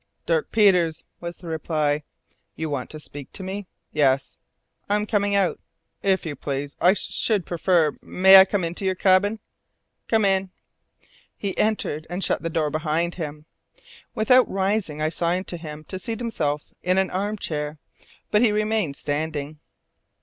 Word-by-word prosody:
"Dirk 480 -2 0
Peters," 180 -7 +3
was 170 0 -6
the 175 - -12
reply. 155 -2 0 0.5
"You 160 -1 -4
want 135 -3 -3
to 155 - -8
speak 145 -2 -10
to 190 - -8
me?" 190 +1 -5 0.3
"Yes." 135 -3 +1 0.5
"I 205 - +3
am 210 0 0
coming 205 -1 +1
out." 195 -3 +1 0.4
"If 190 -2 +1
you 155 -3 -4
please 140 +1 -4
I 180 - +6
should 205 -1 -1
prefer 170 -3 +2
may 190 +1 +7
I 190 - +9
come 195 -1 -1
into 170 +3 -3
your 190 -1 +1
cabin?" 200 +3 +3 0.7
"Come 220 -2 +3
in." 195 -1 +2 0.9
He 200 -2 -3
entered, 205 -8 0
and 180 +2 -3
shut - - 0
the 165 - -2
door 155 -2 0
behind 160 +3 0
him. 150 -1 -6 0.7
Without 250 +3 +4
rising 190 -6 -1
I 155 - +2
signed 175 +3 -1
to 175 - -3
him 155 -2 -8
to 185 +4 -6
seat 225 +4 -4
himself 150 -11 -2
in 180 +1 +2
the 190 0 +3
arm 205 +3 -1
chair, 150 -4 -4 0.5
but 210 - +4
he 235 -3 +4
remained 210 -7 0
standing. 150 0 -3
180 Hz, 165 wpm, -24 LUFS, 155-200 Hz, 0.9 s, I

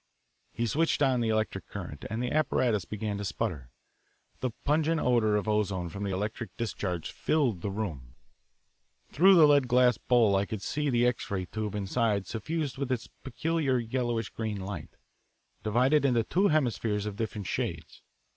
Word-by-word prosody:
He 120 - -2
switched 150 +5 +1
on 130 -3 +3
the 115 - 0
electric 110 -3 -1
current, 85 -8 -7
and 110 +3 -2
the 125 - -2
apparatus 125 - +1
began 105 -1 -4
to - - -3
sputter. 70 -8 -3 0.7
The 130 - -1 0.2
pungent 160 +2 +2
odour 115 -5 +2
of 105 +1 -1
ozone 100 -5 0
from 100 +4 -7
the 100 - -2
electric 105 +1 -4
discharge 95 -7 -3
filled 130 - 0
the 100 - -2
room. 80 - -5 1.0
Through 190 +8 +6
the 165 -3 +8
lead 145 -3 +4
glass 125 -2 +4
bowl 115 -5 +3
I 100 +1 +1
could 105 -3 -5
see 150 -1 -1
the 120 -2 +3
X 125 -1 -1
ray 95 -2 -2
tube 105 +2 -4
inside 105 0 0
suffused 135 - -3
with 140 -2 -2
its 120 -2 -2
peculiar, 135 +2 0
yellowish 120 -1 -1
green 110 -3 -3
light, 95 -5 -7 0.6
divided 125 +8 +3
into 125 -4 +3
two 190 - +2
hemispheres 115 - 0
of 105 -2 -4
different 105 -2 -4
shades. - - -4
115 Hz, 165 wpm, -29 LUFS, 100-130 Hz, 1.0 s, the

